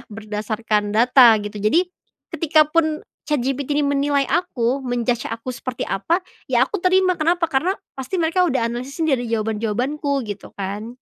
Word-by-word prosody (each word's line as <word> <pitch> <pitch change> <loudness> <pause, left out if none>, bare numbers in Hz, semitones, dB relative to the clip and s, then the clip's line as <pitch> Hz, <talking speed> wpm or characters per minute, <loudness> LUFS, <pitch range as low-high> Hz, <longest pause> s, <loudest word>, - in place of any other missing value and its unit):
berdasarkan 210 0 -2
data 240 +1 +6
gitu 205 +1 -7
jadi, 330 - +3 0.5
ketika 310 -1 +3
pun 315 -1 +1 0.3
ChatGPT 275 0 -1
ini 295 - +2
menilai 280 0 +1
aku 275 -7 0
men-judge 245 -1 -1
aku 230 +2 -7
seperti 255 0 -5
apa 330 - 0 0.3
ya - - +3
aku - - -2
terima 370 -1 +3
kenapa? 335 +1 +1
Karena 315 +8 +1 0.2
pasti 265 +8 -4
mereka 335 +3 +2
udah 255 -5 0
analisis 255 +6 -6
ini 315 -3 +3
dari 245 -1 -4
jawaban-jawabanku 230 +7 -1
gitu 205 -1 -7
kan. 205 +5 -5
260 Hz, 150 wpm, -21 LUFS, 225-310 Hz, 0.5 s, data